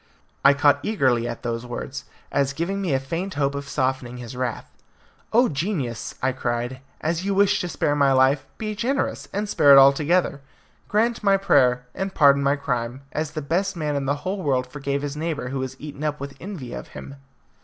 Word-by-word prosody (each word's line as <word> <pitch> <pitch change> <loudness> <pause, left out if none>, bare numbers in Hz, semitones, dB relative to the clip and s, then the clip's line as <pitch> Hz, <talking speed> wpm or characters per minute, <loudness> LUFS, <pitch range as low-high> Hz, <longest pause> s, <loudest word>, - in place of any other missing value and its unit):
I 140 0 +7
caught 145 0 +4
eagerly 130 - +1
at 120 - -6
these 115 0 -2
words, 125 +2 -6 0.3
as 140 -1 +1
giving 185 +6 -2
me 185 -5 -1
a - - +2
faint 170 +8 -4
hope 140 -1 +1
of 140 0 -6
softening 130 -3 -1
his 120 0 -8
wrath. 125 -2 -3 0.6
"O 245 +3 +5
genius!" 140 - -3
I 130 - +3
cried, 125 0 -3 0.2
"as 165 +2 -1
you 200 0 0
wish 200 0 +3
to 180 - -3
spare 145 -3 0
my 140 -2 +4
life, 135 +1 +3
be 215 -1 -3
generous, 250 +7 -1
and 210 +2 -2
spare 145 -8 +6
it - - +9
altogether. 145 +3 +4 0.5
Grant 225 +2 +1
my 195 -1 +4
prayer, 130 -10 +3
and 190 0 -4
pardon 140 -2 +5
my 140 +1 +2
crime, 125 -2 -3
as 155 0 -2
the 155 -2 -4
best 175 +8 0
man 150 -3 -2
in 140 -1 -2
the 140 - +2
whole 190 +1 -2
world 130 -5 +1
forgave 140 +1 -3
his 145 0 -3
neighbour 155 -5 -3
who 135 +1 -3
was 130 0 -5
eaten 145 -1 -8
up 150 -1 -1
with 140 0 -6
envy 170 -11 -7
of - - -7
him." 140 - -9
140 Hz, 200 wpm, -23 LUFS, 130-175 Hz, 0.6 s, it